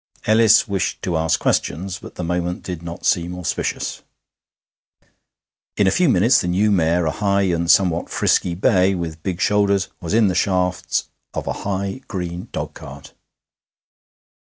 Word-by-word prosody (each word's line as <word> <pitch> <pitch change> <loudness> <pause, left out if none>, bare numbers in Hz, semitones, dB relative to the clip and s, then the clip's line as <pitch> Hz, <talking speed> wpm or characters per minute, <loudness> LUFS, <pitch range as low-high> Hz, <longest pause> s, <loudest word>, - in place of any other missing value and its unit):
Ellis 110 0 +5
wished 100 -3 -2
to 90 - -1
ask 80 0 +1
questions, 90 +5 -1
but - - -12
the - - -5
moment 90 +1 -2
did 90 -3 -6
not 85 0 -8
seem 90 +1 0
auspicious. 90 - -3 1.8
In 105 - +3
a 95 - +3
few 180 - +3
minutes 115 +4 +4
the 90 - -3
new 100 +4 +2
mare, 85 -2 +2
a 80 - +1
high 100 +4 +1
and 85 -3 0
somewhat 90 -3 +3
frisky 85 - +1
bay, 95 +1 +3
with 80 -3 -5
big 90 0 -3
shoulders, 100 -2 +2
was 85 +4 -2
in 115 -1 +4
the 95 - 0
shafts 90 -2 0 0.2
of - - -3
a - - -2
high, 100 +4 -4
green 90 0 -5
dogcart. 70 0 -8
90 Hz, 155 wpm, -20 LUFS, 85-100 Hz, 1.8 s, Ellis